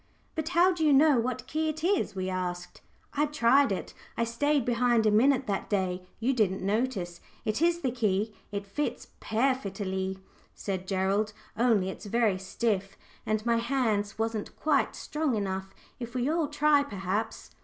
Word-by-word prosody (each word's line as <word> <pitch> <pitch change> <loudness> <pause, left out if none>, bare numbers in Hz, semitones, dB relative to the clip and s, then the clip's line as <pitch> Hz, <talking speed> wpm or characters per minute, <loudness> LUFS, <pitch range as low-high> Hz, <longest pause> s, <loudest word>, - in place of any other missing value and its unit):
"But 315 -1 -3
how 360 +1 +4
do 335 -2 -2
you 300 -2 +5
know 285 -2 +6
what 250 +1 -2
key 315 +3 -1
it 310 +1 -5
is?" 375 - +1
we 185 -1 -2
asked. 180 -1 -4 0.3
"I 295 +1 +2
tried 275 -3 +4
it 190 - -3 0.2
I 230 - +2
stayed 275 +3 +1
behind 240 -1 +2
a 215 - +4
minute 260 +5 +4
that 200 -3 -2
day; 185 -2 -1
you 245 +4 +1
didn't 200 -6 +1
notice. 200 -4 -1 0.2
It 215 +5 -1
is 340 0 +3
the 260 - 0
key. 215 -3 0 0.2
It 200 -1 -4
fits 245 +10 -3
pairfittly," 200 -6 -1 0.4
said 185 -2 -4
Gerald. 195 +3 0 0.2
"Only 220 -5 +2
it's 200 - -8
very 215 -3 +2
stiff, 195 0 -2 0.3
and 215 0 0
my 235 -1 +3
hands 230 -5 0
wasn't 225 -1 -2
quite 300 -3 +2
strong 300 -5 -1
enough. 190 -2 -3 0.3
If 240 0 -7
we 250 +1 0
all 320 0 +1
try, 295 0 +3
perhaps." 205 -3 -3
230 Hz, 165 wpm, -29 LUFS, 195-275 Hz, 0.4 s, know